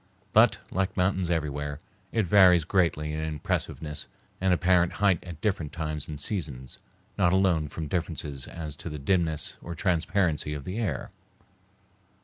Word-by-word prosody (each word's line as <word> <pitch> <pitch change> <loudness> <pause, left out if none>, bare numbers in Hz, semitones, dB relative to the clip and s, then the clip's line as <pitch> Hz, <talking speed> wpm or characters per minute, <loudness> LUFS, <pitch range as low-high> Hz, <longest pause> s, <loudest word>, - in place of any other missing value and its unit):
But, - - +6
like 95 +2 -1
mountains 90 -1 +1
everywhere, 75 -3 -2 0.3
it 110 -3 +1
varies 90 -2 +6
greatly 80 -3 +1
in 80 - -2
impressiveness 75 0 -2 0.3
and 95 0 +3
apparent 90 0 +3
height 100 -5 +2
at 85 -3 -8
different 85 -8 -1
times 75 -3 -3
and 75 -2 -6
seasons, 70 - -3 0.4
not 85 - +4
alone 90 -5 +3
from 75 +2 -5
differences 75 -6 -3
as 80 -3 -6
to 85 - -6
the 75 - -5
dimness 80 +1 0
or 85 - -6
transparency 85 -3 +1
of 70 - -6
the 95 +9 -4
air. 95 - -2
85 Hz, 145 wpm, -27 LUFS, 75-90 Hz, 0.4 s, But